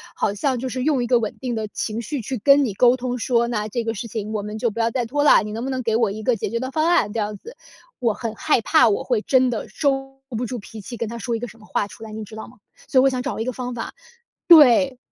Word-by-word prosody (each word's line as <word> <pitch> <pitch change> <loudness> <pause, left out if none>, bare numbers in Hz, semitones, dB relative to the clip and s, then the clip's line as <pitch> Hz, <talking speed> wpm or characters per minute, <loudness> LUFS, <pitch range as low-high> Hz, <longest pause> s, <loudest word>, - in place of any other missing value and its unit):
好 200 - 0
像 255 +5 -1
就 260 - -3
是 255 +1 -3
用 275 -4 +1
一 - - -3
个 245 0 +4
稳 220 -2 -4
定 250 -3 -3
的 220 -1 -3
情 215 +2 -3
绪 280 +3 -4
去 255 +3 -4
跟 280 +6 +5
你 220 - -3
沟 245 +5 +4
通， 250 0 -3
说： 235 0 +1
“那 210 -3 -2
这 235 +2 -3
个 225 0 -2
事 230 +2 -6
情 215 -1 -5
我 215 - -1
们 210 +1 -6
就 235 +2 0
不 230 - -7
要 230 0 +1
再 245 0 -1
拖 290 +5 -1
啦， 295 - +6
你 210 - -6
能 225 +2 -4
不 265 - -3
能 260 -1 -2
给 225 -1 0
我 225 -3 +2
一 215 +2 -7
个 245 +2 +2
解 215 - -3
决 235 - -2
的 260 +2 -4
方 310 +3 +1
案。” 340 -12 +3
这 230 - -2
样 210 -1 -3
子。 470 - -12 0.5
我 230 -3 +3
很 230 -3 -4
害 310 -6 +1
怕 310 +1 +4
我 200 - 0
会 240 -4 0
真 260 +1 +3
的 225 - -4
收 270 -2 -2
不 235 -1 -3
住 250 - -4
脾 220 0 -10
气， 240 +4 -8
跟 230 - -3
他 235 +2 -6
说 235 -1 -2
一 - - -3
个 245 - -5
什 230 - -15
么 215 - -17
话 205 - -1
出 220 - -13
来， 220 - -9
你 220 0 -6
知 215 - -12
道 220 - -8
吗？ 250 - -17 0.3
所 260 - +3
以 - - +5
我 - - +5
想 255 -1 -2
找 - - -4
一 225 - -2
个 255 - -1
方 250 0 -5
法 230 - -6 0.5
对， 275 -5 +7
235 Hz, 335 characters per minute, -22 LUFS, 220-260 Hz, 0.5 s, 对